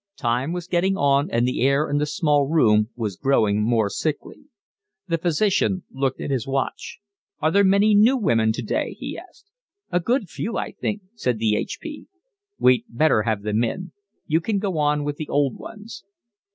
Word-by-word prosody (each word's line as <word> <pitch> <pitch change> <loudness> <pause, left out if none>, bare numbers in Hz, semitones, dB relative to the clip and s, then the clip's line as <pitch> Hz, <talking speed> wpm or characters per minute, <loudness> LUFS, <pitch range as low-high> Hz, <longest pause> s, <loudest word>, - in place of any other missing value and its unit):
Time 120 +6 -1
was 175 -1 -4
getting 185 +2 +1
on, 140 0 +2
and 120 +1 +1
the 125 - -2
air 140 +3 +2
in 145 0 0
the 150 - 0
small 150 -2 +1
room 110 -9 +3
was 110 -5 -3
growing 110 -4 +2
more 110 -1 +2
sickly. 155 - -4 0.6
The 165 -2 0
physician 185 +2 +1
looked 135 -1 -2
at - - -4
his 130 -4 -1
watch. 135 0 -3 0.4
"Are 155 - +1
there 200 +2 +4
many 200 +2 +4
new 225 +6 +5
women 115 - +2
today?" 110 - -3
he - - -6
asked. 400 - -14 0.4
"A 175 - +2
good 235 +3 0
few, 225 +6 -4
I - - -3
think," 210 -2 -4
said 125 - -1
the 110 -1 +1
H.P. 300 - -5 0.5
"We'd 125 -2 +3
better 130 -1 +2
have 110 -2 -2
them 105 +2 0
in. 180 +10 -4 0.3
You 160 +2 +1
can 210 +4 -1
go 190 -5 -2
on 150 0 +1
with 145 0 -3
the 155 - -6
old 140 -3 0
ones." 220 +1 -10
145 Hz, 180 wpm, -23 LUFS, 120-185 Hz, 0.6 s, new